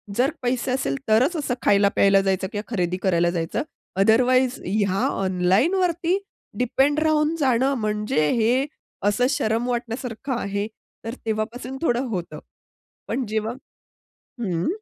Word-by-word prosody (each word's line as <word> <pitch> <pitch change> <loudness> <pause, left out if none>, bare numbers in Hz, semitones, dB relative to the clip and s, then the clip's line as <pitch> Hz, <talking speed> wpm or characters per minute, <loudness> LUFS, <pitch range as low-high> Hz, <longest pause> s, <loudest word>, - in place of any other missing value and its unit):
जर 265 +5 +2
पैसे 250 0 -1
असेल 135 - 0
तरच 255 +11 +4
असं 275 -4 -1
खायला-प्यायला 200 -1 +4
जायचं 190 0 0
किंवा 210 +3 -5
खरेदी 180 -2 0
करायला 175 -2 +3
जायचं, 165 +5 -2 0.4
अदरवाईज 250 +5 +4
ह्या 195 0 +1
ऑनलाईनवरती 330 - +1 0.4
डिपेंड 270 +4 +2
राहून 310 0 +2
जाणं 265 -1 +2
म्हणजे 210 -8 0
हे 245 +4 +2 0.4
असं 245 +5 +2
शरम 240 -4 0
वाटण्यासारखं 240 +2 -3
आहे. 200 +1 -2 0.4
तर 230 - -4
तेव्हापासून 230 +4 -3
थोडं 250 -4 +1
होतं. 185 -7 -4 0.7
पण 265 - -1
जेव्हा 220 +1 -2 0.9
हं. 175 -6 -1
230 Hz, 120 wpm, -23 LUFS, 200-260 Hz, 0.9 s, तरच